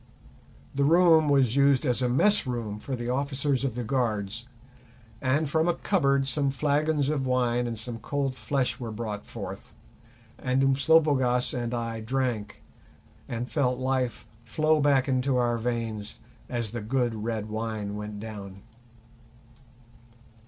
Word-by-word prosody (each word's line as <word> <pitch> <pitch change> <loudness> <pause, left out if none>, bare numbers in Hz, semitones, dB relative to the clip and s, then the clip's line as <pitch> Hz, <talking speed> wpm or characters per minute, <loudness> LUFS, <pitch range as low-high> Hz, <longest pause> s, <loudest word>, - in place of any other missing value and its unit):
The 140 - +1
room 160 0 +5
was 135 -4 +3
used 140 0 +4
as 125 -1 +1
a 125 - +1
mess 205 +7 +3
room 115 -4 -3
for 135 +4 -4
the 120 0 -4
officers 140 +1 0
of 130 -4 -1
the 125 - -3
guards, 110 -3 -2 0.7
and 140 +4 +1
from 160 +3 +1
a 175 - +2
cupboard 140 -8 +1
some 140 0 0
flagons 145 +1 +1
of 140 -3 -1
wine 125 -1 +1
and 115 -1 -4
some 115 +1 -6
cold 135 +2 -2
flesh 135 0 -1
were 120 -2 -5
brought 105 -2 -5
forth, - - -8 0.6
and 130 +1 +1
Umslopogaas 135 -3 +3
and 120 -2 -2
I 115 -2 -3
drank, 110 - -2 0.7
and 120 +1 -3
felt 125 -3 0
life 130 -2 -1 0.2
flow 155 +4 +2
back 140 -2 +3
into 130 0 +1
our 120 -1 +1
veins 115 - -3 0.3
as 120 -4 -2
the 120 -1 -4
good 120 +2 0
red 110 -1 -3
wine 110 -2 -3
went 105 0 -6
down. 100 -3 -8
125 Hz, 145 wpm, -27 LUFS, 115-140 Hz, 0.7 s, room